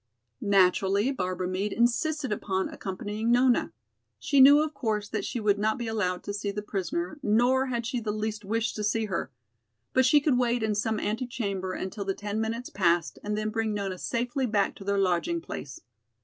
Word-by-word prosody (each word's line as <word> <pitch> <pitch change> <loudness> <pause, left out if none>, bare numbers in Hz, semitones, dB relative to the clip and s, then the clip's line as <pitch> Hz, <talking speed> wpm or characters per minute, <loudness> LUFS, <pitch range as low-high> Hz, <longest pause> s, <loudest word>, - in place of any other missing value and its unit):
Naturally 200 +3 +3
Barbara 185 -6 -2
Meade 190 +3 -2
insisted 260 +4 +1
upon 190 -2 -1
accompanying 205 +4 -4
Nona. 245 - +3 0.5
She 275 - +1
knew, 285 +3 +8
of 310 0 -4
course, 215 -6 -2
that - - -3
she 240 - -3
would 205 -2 +2
not 215 +3 +1
be 240 - -4
allowed 205 -5 -1
to 205 - -4
see 205 0 -3
the 205 +1 -4
prisoner, 300 - -3
nor 250 +4 +3
had 240 -2 -2
she 245 +1 -1
the 215 -2 -2
least 215 0 -3
wish 225 +3 -1
to 210 - -4
see 220 +1 +1
her. 185 -9 -3 0.6
But 260 0 +4
she 295 +3 +6
could 285 -4 +2
wait 240 -1 +1
in 215 -1 +1
some 215 +1 -1
antechamber 210 -5 -2
until 195 +3 -4
the 195 -1 -2
ten 210 +1 -3
minutes 230 +2 -3
passed 170 -3 +1
and 210 0 -2
then 215 0 -1
bring 220 -1 -1
Nona 195 -3 -3
safely 245 +2 -1
back 205 -3 +1
to - - -9
their 200 0 0
lodging 195 - +1
place. 140 - -8
215 Hz, 190 wpm, -27 LUFS, 200-240 Hz, 0.6 s, knew